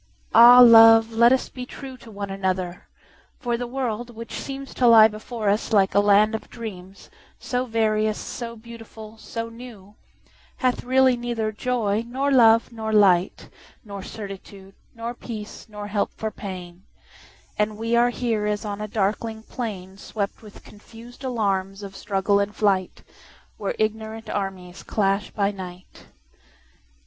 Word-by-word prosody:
Ah, 240 +2 +9
love, 225 -1 +8
let 235 +2 +5
us 260 - +2
be 250 - -8
trueTo 255 -1 -10
one 200 -2 -6
another! 185 -2 -3 0.5
for 240 -1 -2
the 245 +1 -4
world, 240 -2 -3
which 230 +1 -9
seemsTo 270 -2 -1
lie 220 -1 +8
before 215 +1 -6
us 205 +4 0
like 195 -3 +3
a - - +4
land 205 +2 +4
of 220 - -5
dreams, 195 -5 -10 0.3
So 250 0 -2
various, 215 -2 0
so 235 -1 -6
beautiful, 225 -1 -12
so 230 0 -6
new, 230 -4 -12 0.6
Hath 255 -1 0
really 260 0 +3
neither 235 -2 -3
joy, 220 -1 -1
nor 270 +4 -1
love, 230 -2 +5
nor 220 -1 -5
light, 195 -4 +3 0.4
Nor 200 -2 -7
certitude, 195 -1 -10 0.2
nor 230 +1 -5
peace, 220 -2 -9
nor 210 -1 -8
help 205 0 -1
for 220 0 -4
pain; 185 -4 -8 0.8
And 210 0 0
we 230 +1 -1
are 240 +1 +4
here 230 -4 -2
as 210 +1 -2
on 205 0 -5
a 215 - -4
darkling 220 +2 -2
plainSwept 200 -2 -6
with 210 -2 -14
confus'd 230 +4 -14
alarms 200 -5 -2
of 195 -1 -9
struggle 195 +1 0
and 200 +1 -2
flight, 195 -3 0 0.5
Where 200 - -3
ignorant 220 +1 -3
armies 190 -2 -5
clash 195 -1 -1
by 200 -1 -1
night. 185 -2 -11
220 Hz, 145 wpm, -23 LUFS, 200-235 Hz, 0.8 s, Ah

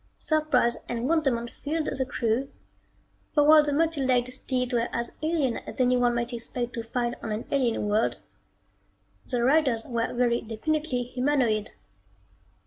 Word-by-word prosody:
Surprise 300 -7 +2
and 240 +1 -2
wonderment 270 -7 +1
filled 310 +1 -1
the 265 - -1
crew, 235 +3 -1 0.9
for 295 - +5
while 305 +1 +8
the 295 -1 0
multi 320 0 +1
legged 255 -1 +1
steeds 255 -1 -2
were 235 0 +1
as 235 0 -3
alien 310 -6 0
as - - -9
anyone 245 -1 +3
might 240 +1 -2
expect 240 +1 -4
to 230 - -3
find 240 +1 -2
on 220 - -4
an 215 +2 -3
alien 245 -6 +1
world, 210 +2 +1 1.1
the 245 -2 0
riders 265 -4 +3
were 230 -1 -2
very 240 -1 +1
definitely 250 +4 -2
humanoid. 250 -4 0
250 Hz, 145 wpm, -27 LUFS, 235-285 Hz, 1.1 s, while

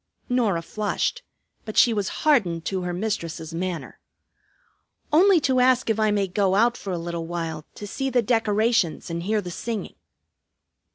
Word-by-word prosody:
Norah 220 -9 +1
flushed; 215 - -2 0.4
but 215 - -7
she 235 - +6
was 205 -3 -1 0.2
hardened 185 - +3
to 190 -1 -2
her 180 0 -3
mistress's 175 -4 -3
manner. 175 -1 -4 1.1
"Only 365 +3 +6
to 260 -2 +2
ask 250 -2 +3
if 220 - -1
I 215 0 +3
may 205 -1 +1
go 190 +1 +1
out 235 +3 +3
for 195 - -6
a 180 - -1
little 170 -1 -4
while 165 -2 -4
to 210 - -7
see 270 +6 -3
the 245 -2 +2
decorations 220 -6 +1
and 170 0 -3
hear 210 +4 0
the 180 -2 -7
singing." 225 +4 -4
205 Hz, 165 wpm, -24 LUFS, 175-235 Hz, 1.1 s, she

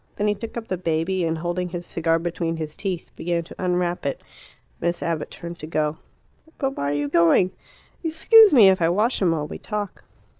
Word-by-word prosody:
Then 210 - 0
he 210 - +3
took 230 +3 -7
up 225 -1 -5
the 185 - -3
baby, 175 +2 0
and, 165 0 -1
holding 175 +2 -2
his 175 0 -6
cigar 165 -1 0
between 165 0 -3
his 155 -1 -5
teeth, 190 -4 -4
began 170 0 -1
to 165 - -12
unwrap 180 -1 0
it. 140 - -2 0.6
Miss 170 0 -1
Abbott 165 -2 -2
turned 170 0 -8
to 155 - -7
go. 155 -1 -1 0.6
"But 270 -1 -2
why 140 - -2
are - - 0
you 145 0 -1
going? 170 +4 +4 0.5
Excuse 400 +7 +6
me 230 -8 +8
if 190 -1 +2
I 165 - +3
wash 210 +8 +1
him 185 - +3
while 155 -3 -1
we - - -8
talk." 210 -2 -5
175 Hz, 210 wpm, -23 LUFS, 165-195 Hz, 0.6 s, me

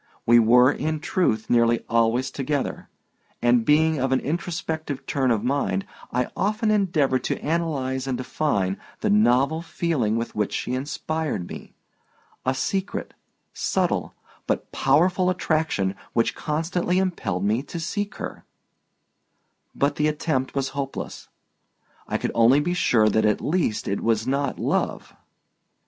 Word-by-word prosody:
We 120 +1 +7
were, 125 +3 +6
in 155 +1 -2
truth, 130 -9 0
nearly 115 -1 +3
always 115 +3 +2
together, 140 0 -3 0.5
and 120 -1 +3
being 155 +2 +3
of 130 +1 0
an 130 - +3
introspective 160 -2 -3
turn 135 -3 0
of 115 -3 +1
mind 125 -7 0 0.3
I 125 0 0
often 215 +2 +1
endeavored 160 -11 +2
to - - -1
analyze 140 -5 -1
and 130 -2 -1
define 100 -9 -1 0.2
the 210 - +1
novel 160 - +3
feeling 155 -10 -1
with 115 +1 -3
which 105 -1 -1
she 125 - -2
inspired 145 - -3
me—a 130 +1 -8
secret, 195 +8 -2 0.4
subtle, - - -1 0.3
but - - -2
powerful 180 +7 +3
attraction 155 - 0 0.2
which 115 - +2
constantly 170 +4 -1
impelled 180 - -1
me 110 +4 +1
to 160 +4 -7
seek 205 +5 -3
her; - - -7 1.3
but 140 +1 +1
the 150 - +2
attempt 150 -4 -1
was 135 -1 0
hopeless. 140 -1 -5 0.8
I - - -1
could - - -2
only 115 +5 +5
be 175 +4 0
sure 120 -10 +3
that 110 +1 +2
at 105 -1 +2
least 155 -9 0
it 100 - -1
was 110 -1 +1
not 140 +2 -1
love. - - -1
140 Hz, 135 wpm, -24 LUFS, 120-160 Hz, 1.3 s, We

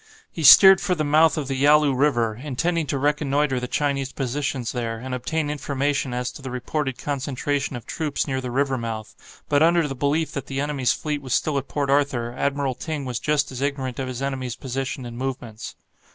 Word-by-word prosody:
He 165 - -6
steered 190 +6 +9
for 180 - 0
the 155 - -1
mouth 155 +2 +4
of 145 -3 -2
the 135 - -2
Yalu 145 +1 +4
River, 125 -5 +2
intending 150 +6 -2
to 140 - -1
reconnoitre 145 -1 +1
the 125 - -4
Chinese 140 -1 -1
positions 135 -2 -2
there, 115 -2 -3
and 130 +3 -6
obtain 145 +4 -2
information 140 -1 -1
as 125 0 -2
to - - -12
the 135 - -6
reported 130 +1 -3
concentration 140 0 -2
of 120 - -8
troops 150 -3 -2
near 130 -2 -2
the 125 - -5
river 135 +1 0
mouth, 110 -2 -8
but 145 0 +2
under 165 -1 +4
the 135 - -4
belief 145 +4 0
that 140 -1 -5
the 135 0 -3
enemy's 145 -3 0
fleet 150 -2 -3
was 130 -3 -1
still 155 - 0
at 135 - -9
Port 140 -2 -1
Arthur, 135 -4 +1
Admiral 140 -1 -1
Ting 150 +2 -5
was 125 -3 -3
just 150 -2 0
as 130 0 -6
ignorant 135 -3 -2
of 130 - -2
his 130 +1 -5
enemy's 130 -3 -3
position 130 0 -4
and 120 0 -7
movements. 125 -4 -5
140 Hz, 205 wpm, -23 LUFS, 125-145 Hz, -, steered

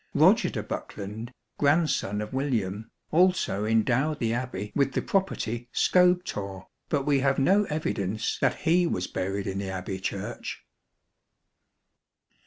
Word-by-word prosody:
Roger - - +5
de - - -4
Bokelond, 105 +3 -6 0.3
grandson 140 - +2
of 105 +2 -6
William, 110 -7 -1 0.2
also 175 - +2
endowed 125 +7 +2
the 115 -4 0
Abbey 115 -5 -4
with 135 -2 +2
the - - 0
property 120 - -1
Scobethorre, 175 - +2 0.2
but 140 -3 0
we 145 -2 +3
have 135 0 +2
no 195 +10 +4
evidence 110 - -2
that 130 -2 +1
he 175 +1 +3
was 90 - -1
buried 95 +1 -3
in 95 0 -3
the 100 -1 -3
Abbey 95 0 -4
Church. 100 +4 -5
120 Hz, 130 wpm, -27 LUFS, 100-150 Hz, 0.3 s, Roger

